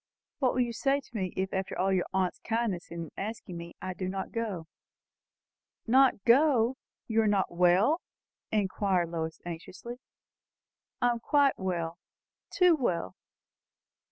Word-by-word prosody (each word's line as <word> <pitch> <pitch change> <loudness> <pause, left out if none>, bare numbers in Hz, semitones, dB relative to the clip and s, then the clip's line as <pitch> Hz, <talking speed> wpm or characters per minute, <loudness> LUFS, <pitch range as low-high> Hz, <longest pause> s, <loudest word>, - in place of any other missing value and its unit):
"What 260 -3 +2
will 255 - +3
you 240 -1 0
say 275 +4 +1
to 265 - -17
me, 185 -4 -1
if 190 0 -1
after 190 0 -2
all 195 +1 +2
your 180 -2 +1
aunt's 185 -1 0
kindness 225 -6 -2
in 165 -2 -6
asking 215 -2 -5
me, 170 0 -8
I 185 - -3
do 185 0 -4
not 190 0 -4
go?" 210 -8 -3 1.2
"Not 255 -3 +4
go? 255 -1 +4 0.3
You 225 -1 +2
are 220 - +2
not 200 -2 +2
well?" 180 - +4 0.5
inquired 190 -4 +1
Lois 160 -1 -3
anxiously. 185 +8 -7 1.0
"I 245 - +5
am 235 - -2
quite 280 +3 +3
well 170 -2 -2 0.5
too 360 -3 +5
well!" 180 - -1
195 Hz, 145 wpm, -29 LUFS, 180-240 Hz, 1.2 s, I